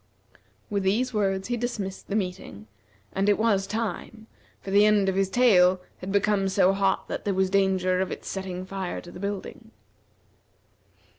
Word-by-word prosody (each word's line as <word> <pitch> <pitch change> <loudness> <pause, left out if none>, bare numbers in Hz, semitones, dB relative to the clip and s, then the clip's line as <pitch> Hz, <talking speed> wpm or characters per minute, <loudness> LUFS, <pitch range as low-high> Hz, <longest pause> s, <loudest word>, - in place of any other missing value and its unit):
With 200 -1 -1
these 225 +7 0
words 195 -1 0
he 240 - 0
dismissed 220 -5 -4
the 200 - -3
meeting, 180 - -4 0.5
and 195 +2 +1
it 205 - +4
was 205 -3 +1
time, 220 +1 -4 0.3
for 195 - -7
the 200 +1 +6
end 210 -2 +4
of 190 - +2
his 195 -1 +1
tail 190 -6 +4 0.2
had 185 - -6
become 200 -1 +2
so 190 0 +3
hot 195 0 0
that - - -5
there 200 -2 -1
was 190 0 +1
danger 190 -2 +2
of 190 - -2
its - - -7
setting 185 -1 -5
fire 190 -1 -4
to 175 - -12
the - - -10
building. 200 0 -6
195 Hz, 170 wpm, -26 LUFS, 190-210 Hz, 0.5 s, the